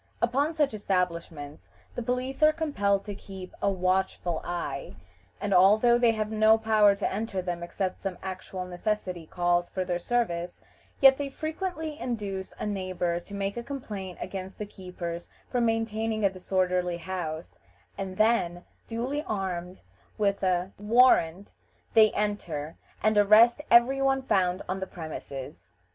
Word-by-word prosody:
Upon 275 +6 +1
such 295 -5 +2
establishments 170 -7 -3 0.2
the - - -4
police 250 +3 -2
are 305 0 +7
compelled 205 -12 0
to 205 - -5
keep 190 -2 -10
a 200 - +3
watchful 185 -2 0
eye, 145 -10 -4 0.4
and 200 0 -1
although 215 +6 +6
they 235 -2 +4
have 215 -1 -2
no 220 0 +5
power 215 -2 +4
to 200 - -2
enter 205 -1 -2
them 175 -1 -3
except 185 +2 -3
some 195 -2 -4
actual 185 0 -5
necessity 180 -2 -3
calls 175 0 +1
for 185 -1 -2
their 175 -1 -1
services, 175 -5 -1 0.4
yet 270 -1 +8
they 285 -1 -2
frequently 315 +1 -4
induce 200 -6 -4
a - - -4
neighbor 185 -4 -1
to 200 - -13
make 200 0 -2
a - - -2
complaint 210 -9 -6
against 190 0 -6
the 210 - -4
keepers 180 -3 -7 0.2
for 245 - +1
maintaining 225 -1 0
a 195 - +3
disorderly 180 -1 0
house, 170 -2 -5 0.4
and 190 -1 -5
then, 180 -6 +2 0.2
duly 250 +6 -2
armed 185 -3 -3 0.4
with 200 -1 +1
a 185 0 +1
warrant, 210 -5 +4 0.4
they 220 -2 +7
enter, 170 -7 -2 0.3
and 215 -1 +4
arrest 225 +6 +6
every 245 +3 +5
one 270 0 +2
found 185 -6 +1
on 185 +1 -2
the 190 - -4
premises. 150 -5 -8
195 Hz, 150 wpm, -28 LUFS, 180-225 Hz, 0.4 s, yet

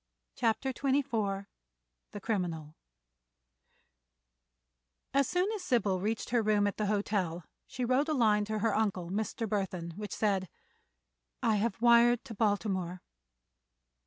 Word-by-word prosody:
CHAPTER 245 +3 0
XXIV 230 -8 0 0.6
THE 205 - -7
CRIMINAL 175 -8 -3 2.4
As 275 -1 +3
soon 365 +4 +1
as 425 -4 -4
Sybil 220 - +1
reached 215 +5 -2
her 240 -1 +3
room 210 -1 +2
at 205 - -1
the 210 - 0
hotel 200 -5 -1 0.2
she 250 - -3
wrote 260 +5 +2
a - - +2
line 215 -5 +3
to 215 +1 -2
her 225 +2 +1
uncle, 190 -5 -1
Mr. 220 +2 -2
Burthon, 190 -5 -3
which 210 -1 -5
said: 195 -4 0 0.9
"I 220 -2 +3
have 215 0 -1
wired 240 +1 +5
to 235 - -7
Baltimore." 195 -4 -1
215 Hz, 130 wpm, -31 LUFS, 195-235 Hz, 2.4 s, wired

